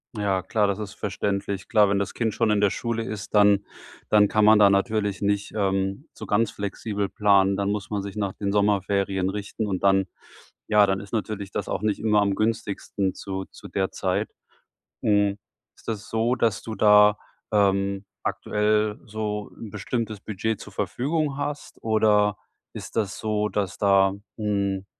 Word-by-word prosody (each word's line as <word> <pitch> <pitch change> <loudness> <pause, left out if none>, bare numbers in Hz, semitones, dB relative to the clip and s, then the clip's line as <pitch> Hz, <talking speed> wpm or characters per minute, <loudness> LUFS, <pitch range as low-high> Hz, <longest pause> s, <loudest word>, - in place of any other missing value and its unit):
Ja, 100 -3 0
klar, 105 -2 +1
das 100 - -1
ist 105 -2 -6
verständlich. 100 -1 -3
Klar, 105 -4 +4
wenn 100 - +2
das 100 0 -2
Kind 110 -3 -1
schon 115 -2 +2
in 105 -1 +2
der 100 - +4
Schule 115 +2 -2
ist, 110 -4 -6
dann 100 -1 +5 0.4
dann 105 -1 +5
kann 105 0 +2
man 110 0 +7
da 100 -1 +7
natürlich 100 0 0
nicht, 100 0 0
ähm, 95 +5 -1
so - - -9
ganz 110 +2 +2
flexibel 100 0 -3
planen. 100 -2 +3
Dann 100 0 0
muss 105 0 -4
man 100 -2 -2
sich 100 0 -7
nach 100 -2 -2
den 100 -1 -3
Sommerferien 100 -2 +1
richten 105 +1 -4
und 95 -3 -2
dann 95 -1 +4 0.6
ja, 105 -1 +5
dann 95 0 0
ist 100 +2 -11
natürlich 100 -2 -3
das - - -3
auch 95 - -2
nicht 105 -1 0
immer 105 -2 +3
am 100 -1 +1
günstigsten 100 -3 -1
zu 95 -1 -5
zu - - -13
der 95 -1 -1
Zeit. - - -1 0.7
Hm, 100 -1 +2 0.4
ist - - -22
das 110 -2 -4
so, 115 +2 +1
dass 115 -5 0
du 110 - -5
da, 105 0 +6 0.4
ähm, 100 -1 +2 0.2
aktuell 105 0 0
so 105 -1 -4
'n 110 - -8
bestimmtes 110 +1 -3
Budget 110 +1 -3
zur - - -11
Verfügung 145 +1 -1
hast? 145 0 -5
Oder 105 -2 +3 0.4
ist - - -9
das 105 -3 -1
so, 105 -1 0
dass 100 -3 -2
da 100 -1 +4 0.2
hm, 100 -2 -1
105 Hz, 175 wpm, -25 LUFS, 100-110 Hz, 0.7 s, man